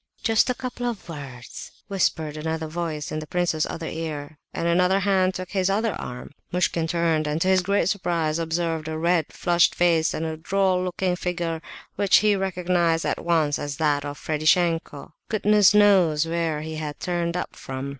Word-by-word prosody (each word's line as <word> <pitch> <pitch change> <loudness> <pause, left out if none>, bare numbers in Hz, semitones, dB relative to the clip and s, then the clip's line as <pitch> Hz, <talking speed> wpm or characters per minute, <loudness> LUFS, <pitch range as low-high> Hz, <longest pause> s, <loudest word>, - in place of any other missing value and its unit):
"Just 225 +2 +3
a 250 - +1
couple 245 -1 -4
of 230 -7 -5
words!" 140 -6 -8 0.2
whispered 160 -6 -1
another 160 +1 -3
voice 155 -2 -4
in 155 - -2
the 155 - -8
prince's 175 -3 0
other 165 - -5
ear, 155 -2 -5
and 170 - -2
another 180 +3 +3
hand 190 -1 +2
took 185 0 -6
his 190 -2 +1
other 215 +2 +1
arm. 125 0 -7 0.2
Muishkin 175 -2 0
turned, 165 -2 +1
and 150 +1 -1
to 185 - 0
his 190 0 +4
great 200 -1 +1
surprise 170 -5 0
observed 165 -1 -2
a 160 0 -3
red, 170 -1 +1
flushed 175 -1 +2
face 170 -2 +2
and 160 - -2
a 160 -1 -4
droll 185 +2 +1
looking 180 0 -1
figure 170 -2 -3 0.4
which 200 -1 +5
he 210 -1 +4
recognized 175 -3 0
at - - -2
once 160 -4 +1
as 145 -1 -4
that 145 -2 +1
of 145 0 -6
Ferdishenko. 160 0 0 0.2
Goodness 210 -1 +4
knows 185 -7 +5
where 165 -2 -1
he 160 0 -6
had 150 -2 -5
turned 175 -1 -1
up - - -5
from! 130 +1 -6
170 Hz, 180 wpm, -24 LUFS, 155-185 Hz, 0.4 s, which